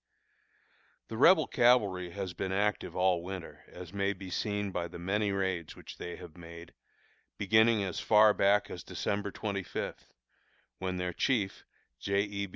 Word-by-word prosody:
The 110 - -5
Rebel 160 +4 +6
cavalry 105 -9 +3
has 95 0 -5
been 95 - -3
very 95 +1 0
active 105 -1 -1
all 90 -1 +2
winter, 95 0 -8
as 90 0 -11
may 100 0 0
be 95 -1 -9
seen 105 +1 -2
by 85 -2 -2
the 85 - -10
many 100 +4 0
raids 95 -4 -2
which - - -11
they 90 - -5
have 85 -3 -12
made, 85 -1 -11 0.6
beginning 110 +1 +4
as 95 -3 -3
far 105 -1 +6
back 100 +1 +2
as - - -7
December 100 0 -2
twenty 100 -1 -3
fifth, - - -6 0.7
when 95 -1 -2
their 90 0 -2
chief, 105 -3 0 0.3
J. 100 +7 +1
E. 100 -1 -4
100 Hz, 165 wpm, -31 LUFS, 90-105 Hz, 0.7 s, Rebel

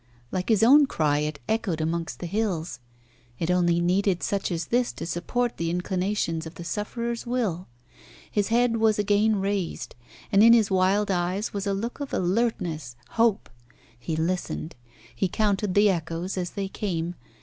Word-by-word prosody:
Like 185 +3 -2
his 220 -1 +4
own 280 +5 +7
cry, 150 - +1
it 150 0 -2
echoed 220 -7 0
amongst 165 +1 -2
the - - -3
hills. 180 - -2 0.6
It 170 +1 -1
only 175 -1 +3
needed 180 +1 +1
such 200 -1 -1
as 165 -1 -2
this 245 0 +2
to - - -6
support 225 +9 -2
the 165 0 -1
inclinations 180 -2 -1
of 160 - -11
the 175 - -8
sufferer's 235 +5 -3
will. 215 -8 -1 0.6
His 205 -2 +1
head 235 0 +2
was 220 -1 +3
again 210 +1 +3
raised. 195 -2 -2 0.4
And 200 -1 +5
in 230 +1 +8
his 220 -4 +4
wild 190 +2 +2
eyes 185 +3 -1
was 200 0 -3
a 200 - +1
look 230 +7 -4
of 285 -1 -4
alertness 175 - -1
hope. 225 -2 +2 0.5
He 155 +7 -3
listened. 165 0 -2 0.4
He 155 - +1
counted 205 -1 0
the 205 0 +6
echoes 165 +1 -3
as 180 -2 -2
they 195 -1 -1
came. 175 -4 -3
195 Hz, 165 wpm, -26 LUFS, 170-220 Hz, 0.6 s, in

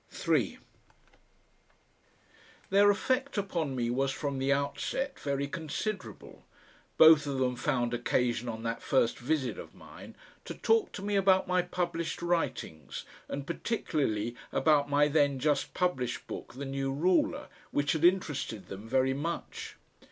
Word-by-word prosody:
3 - - 0 2.1
Their 200 +1 +6
effect 255 +6 0
upon 170 -8 -1
me 120 -1 0
was 135 +2 +1
from 140 0 -3
the 135 +1 +1
outset 140 - -1
very 140 0 -1
considerable. 185 +6 -5 0.5
Both 155 -2 +8
of 140 -1 -2
them 125 -1 +1
found 120 -3 0
occasion 120 0 0
on 110 0 -5
that 115 0 -3
first 125 -4 +1
visit 130 0 -1
of - - -10
mine - - -12 0.3
to - - -6
talk 450 -1 +2
to 195 - -6
me 205 0 -1
about 190 -1 +4
my 180 0 +3
published 170 -2 -3
writings 130 - -2 0.2
and 140 0 -4
particularly 140 - -1 0.2
about 145 0 +3
my 145 +1 +4
then 145 -2 +2
just 145 +2 0
published 130 -10 -1
book - - -8
THE 140 +2 -5
NEW 135 0 -2
RULER, 170 +6 +1 0.2
which 145 0 0
had 160 0 -1
interested 150 - +1
them 100 +3 -8
very 130 +1 +2
much. 165 +5 -5
145 Hz, 140 wpm, -30 LUFS, 130-175 Hz, 2.1 s, Both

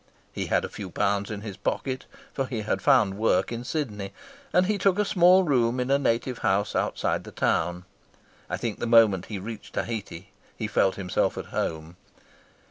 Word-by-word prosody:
He - - -3
had - - +1
a - - -3
few - - -8
pounds 100 0 0
in 105 -2 -5
his 105 -3 -7
pocket, 130 +5 -2 0.3
for 135 -1 -2
he 120 -4 -3
had 105 - -1
found 110 -8 +3
work 95 -3 +2
in 120 0 -4
Sydney, 110 -9 -4 0.4
and 180 +1 +4
he 205 +1 0
took 190 0 +3
a 210 - +2
small 185 -1 +5
room 125 -6 +2
in 125 +2 -1
a 140 - +4
native 120 -2 0
house 100 -1 +1
outside - - 0
the - - -10
town. 90 +2 0 0.6
I - - -2
think 115 -4 -4
the - - -2
moment 110 -5 +5
he 105 - -4
reached 105 +3 -8
Tahiti 105 -5 -4 0.3
he 110 - -3
felt 95 -2 +2
himself 95 -2 -1
at - - -4
home. 80 +2 -3
115 Hz, 190 wpm, -26 LUFS, 100-130 Hz, 0.6 s, small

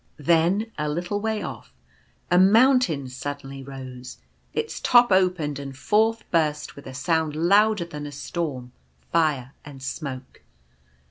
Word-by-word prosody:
Then, 170 +8 +2
a 150 0 -1
little 175 +6 -2
way 220 0 -1
off, - - -8 0.6
a 180 - +6
moun 230 +8 +6
tain 155 - -2
suddenly 135 +1 -6
rose; 130 -2 -9 0.3
its 455 - -3
top 240 -2 +5
opened, 180 -6 +2
and 135 -1 -8
forth 220 +7 +2
burst, 150 -3 0
with 140 - -12
a 130 - -8
sound 160 +2 0
louder 200 +4 +3
than 150 -3 -7
a - - -8
storm, 145 -3 -4 0.4
fire 150 -6 +1
and 135 -2 -11
smoke. 130 -1 -6
155 Hz, 140 wpm, -24 LUFS, 140-190 Hz, 0.6 s, a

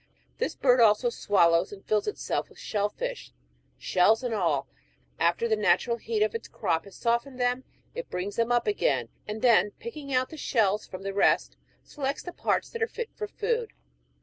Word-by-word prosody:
This 485 - -1
bird 250 -2 +4
also 230 +2 +4
swallows 170 -5 +3
and 200 -1 -11
fills 215 -1 +1
itself 420 - -2
with - - -19
shell 205 -1 -1
fish, - - -5 0.5
shells 210 +7 +3
and 245 -2 -1
all; 160 -9 0 0.5
after 175 +7 +2
the 220 - +2
natural 235 +2 +2
heat 220 -2 0
of 215 - 0
its 230 - -5
crop 165 - -1
has 200 - -13
softened 240 +3 -1
them, 245 +1 0 0.3
it - - -6
brings 190 +3 -4
them 230 +1 +1
up 240 0 +3
again, 420 +4 +1 0.2
and 215 +2 -5
then 230 -4 +5
picking 300 -12 -8
out 255 0 +1
the 315 - -9
shells 210 -7 +1
from 185 0 -8
the 195 0 -3
rest, 200 - +2 0.3
selects 280 -1 -4
the 355 - -7
parts - - -1
that 465 - -6
are 450 - +3
fit 470 0 -6
for 425 - -4
food. 460 +2 -2
235 Hz, 190 wpm, -27 LUFS, 205-280 Hz, 0.5 s, then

